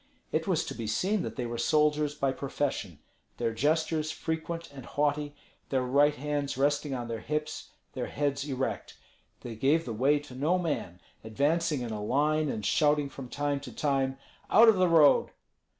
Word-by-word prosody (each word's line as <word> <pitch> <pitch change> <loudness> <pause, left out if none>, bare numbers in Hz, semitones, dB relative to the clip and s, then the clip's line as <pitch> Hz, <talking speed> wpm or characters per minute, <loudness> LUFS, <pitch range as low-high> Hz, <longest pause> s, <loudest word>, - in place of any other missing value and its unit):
It - - -1
was - - +1
to - - -5
be 115 - -5
seen 190 - 0
that - - -5
they 125 - -3
were 120 0 -4
soldiers 150 +2 +2
by 135 -2 0
profession, 135 - -3 0.4
their 115 -1 -1
gestures 155 +5 +1
frequent 160 +1 -4
and 135 -2 -10
haughty, 145 0 -1 0.3
their 130 -2 +1
right 145 +4 +3
hands 145 -1 -2
resting 145 0 +1
on 120 -2 -4
their 115 -1 -4
hips, 150 +4 -4 0.2
their 125 -2 -3
heads 140 -1 -1
erect. 130 0 -3 0.4
They 120 -2 -7
gave 145 +8 +2
the 115 - -4
way 135 +7 +3
to 145 -3 -9
no 150 +8 +1
man, 145 - -3 0.2
advancing 145 +6 0
in 120 -2 -4
a 105 -1 -4
line 150 +6 +1
and 105 -5 -3
shouting 150 +3 +2
from 130 -2 -9
time 145 0 -1
to 140 - -9
time, 135 -2 0 0.3
"Out 225 +1 +7
of 215 - +4
the 185 -1 +3
road!" 160 -4 +5
145 Hz, 180 wpm, -29 LUFS, 130-150 Hz, 0.4 s, Out